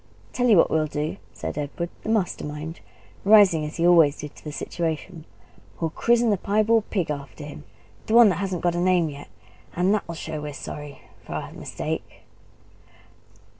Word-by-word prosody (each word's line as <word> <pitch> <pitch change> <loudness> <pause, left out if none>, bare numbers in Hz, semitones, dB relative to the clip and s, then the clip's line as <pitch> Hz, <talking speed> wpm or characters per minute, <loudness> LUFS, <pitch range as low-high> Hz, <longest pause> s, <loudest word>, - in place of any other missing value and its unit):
"I'll - - -30
tell 245 -1 +1
you 210 - +7
what - - +4
we'll 155 -1 +2
do," 150 +1 -3
said - - -5
Edward, 160 +4 -4
the - - -6
master 215 -5 0
mind, 150 +3 -6 0.4
rising 200 -6 +6
as 150 - -6
he 170 - +1
always 165 -5 +6
did 150 -1 -8
to - - -16
the 150 - -6
situation: 160 +2 -4 0.5
"We'll 165 -2 -1
christen 235 +4 +2
the 205 - +2
piebald 215 +3 +2
pig 180 -7 -1
after 140 +1 -7
him 145 0 -9 0.4
the 220 - +2
one 235 -3 +9
that 190 - -1
hasn't 185 -3 -3
got 175 -1 +2
a 175 - -1
name 175 -2 +3
yet. 145 0 -10 0.5
And 180 +3 +2
that'll 180 -5 -2
show 160 -1 -5
we're 150 -1 -5
sorry 145 0 -8 0.2
for - - -8
our - - -5
mistake!" - - -5
170 Hz, 185 wpm, -24 LUFS, 150-200 Hz, 0.5 s, one